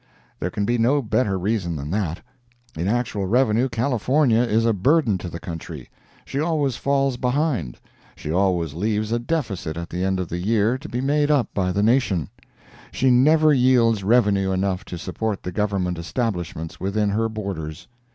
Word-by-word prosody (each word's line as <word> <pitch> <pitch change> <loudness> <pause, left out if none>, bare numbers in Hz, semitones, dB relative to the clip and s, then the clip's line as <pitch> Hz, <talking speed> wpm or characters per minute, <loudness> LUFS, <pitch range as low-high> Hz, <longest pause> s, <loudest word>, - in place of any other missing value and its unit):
There 90 - -2
can 100 +3 -2
be 120 +2 0
no 135 +5 +2
better 105 -3 0
reason 95 -3 -1
than 75 +1 -5
that. 90 -5 -2 0.5
In 85 +3 -2
actual 110 -3 -1
revenue 120 +2 +2
California 125 +1 +2
is 115 -1 +1
a 115 - +3
burden 115 - +2
to 90 - -6
the 85 - -7
country; 85 -1 -8 0.3
she 135 - -4
always 150 -5 0
falls 135 -1 0
behind; 125 - -1 0.4
she 75 - -6
always 90 -4 +1
leaves 105 +5 -1
a 120 - +1
deficit 115 - -3
at 85 0 -6
the 90 +2 -2
end 95 0 0
of 90 - -2
the 85 - -3
year 110 +5 +1
to - - -9
be 125 - -2
made 145 +2 +1
up 145 -5 +1
by 90 -2 0
the 100 +3 0
nation; 110 - +2 0.6
she 130 -1 +2
never 155 +5 +5
yields 120 -5 +3
revenue 100 -3 +3
enough 95 0 -1
to 90 - -7
support 100 +4 -3
the 90 - -4
Government 95 -3 -1
establishments 85 - -3
within 105 +2 0
her 115 +2 0
borders. 95 -8 -6
105 Hz, 175 wpm, -22 LUFS, 90-125 Hz, 0.6 s, never